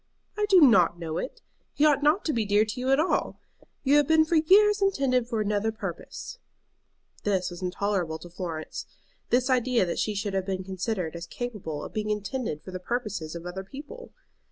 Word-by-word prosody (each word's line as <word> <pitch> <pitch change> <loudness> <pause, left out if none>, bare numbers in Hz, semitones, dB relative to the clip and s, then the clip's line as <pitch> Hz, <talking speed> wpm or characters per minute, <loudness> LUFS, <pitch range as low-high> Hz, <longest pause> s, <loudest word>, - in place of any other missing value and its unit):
"I 420 0 0
do 380 -3 +6
not 190 - +6
know 165 -1 -3
it. - - -6 0.3
He 295 - +3
ought 290 -2 +4
not 300 +7 +3
to 310 - +1
be 230 - +1
dear 205 +1 +3
to 215 +3 -5
you 255 +1 -1
at 270 +1 +4
all. 325 - 0 0.4
You 285 +1 +5
have 295 -2 +3
been 320 0 +5
for 325 +1 +2
years 410 +6 +5
intended 270 -11 +2
for 230 -3 -1
another 210 +1 0
purpose." 225 - -7 0.8
This 190 -3 0
was 175 +1 -9
intolerable 180 -3 -1
to 175 +2 -12
Florence, 170 -3 -5 0.4
this 250 +1 +2
idea 250 -4 +2
that 170 - -3
she 215 - -1
should 200 0 -2
have 190 0 -1
been 190 -1 -2
considered 185 -2 -3
as 170 0 -6
capable 195 -10 -5
of - - -8
being 215 0 -2
intended 210 - -3
for 185 - -9
the 185 - -5
purposes 205 -6 -3
of 170 0 -7
other 185 +2 -5
people! 305 - -10
215 Hz, 200 wpm, -27 LUFS, 185-275 Hz, 0.8 s, do